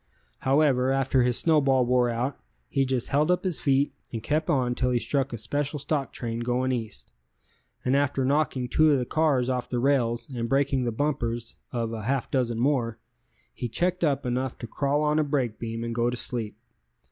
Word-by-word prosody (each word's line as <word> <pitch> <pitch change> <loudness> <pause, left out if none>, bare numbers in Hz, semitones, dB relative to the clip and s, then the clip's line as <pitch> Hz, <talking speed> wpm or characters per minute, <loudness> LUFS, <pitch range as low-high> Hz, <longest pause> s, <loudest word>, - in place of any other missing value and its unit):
However, 135 -2 +3
after 135 -1 +2
his 125 -1 +5
snowball 140 -6 +3
wore 125 0 +2
out, 120 +4 -2 0.3
he 135 - +1
just 130 -2 -1
held 150 +3 +2
up 180 0 +2
his 185 -5 -1
feet 140 0 +2 0.2
and 115 -2 -5
kept 155 +1 0
on 125 -3 +2
till 125 +1 0
he 125 - +2
struck 135 +3 -1
a 120 - -4
special 145 +7 -2
stock 140 -1 -2
train 115 -1 -4
going 125 +2 0
East, 115 -4 -5 0.7
and 130 +2 +2
after 140 -1 +1
knocking 135 -2 +1
two 155 +5 +4
of 145 - +4
the 125 - -1
cars 145 -4 +1
off 125 -1 -2
the 125 - -2
rails 120 -3 +1
and 115 -1 -3
breaking 135 -2 +1
the 120 - 0
bumpers 120 -3 -2 0.2
of 115 -2 -2
a 110 - -4
half 130 +4 -2
dozen 120 -4 0
more, 120 -4 +1 0.6
he 120 - -4
checked 180 - -1
up 140 -4 +1
enough 125 +2 -2
to - - -7
crawl 140 +5 0
on 150 +1 +2
a - - +3
brake 135 -6 -1
beam 115 0 -4
and 115 0 -3
go 120 +1 +1
to 125 - -3
sleep. 110 -4 -2
130 Hz, 200 wpm, -26 LUFS, 120-140 Hz, 0.7 s, his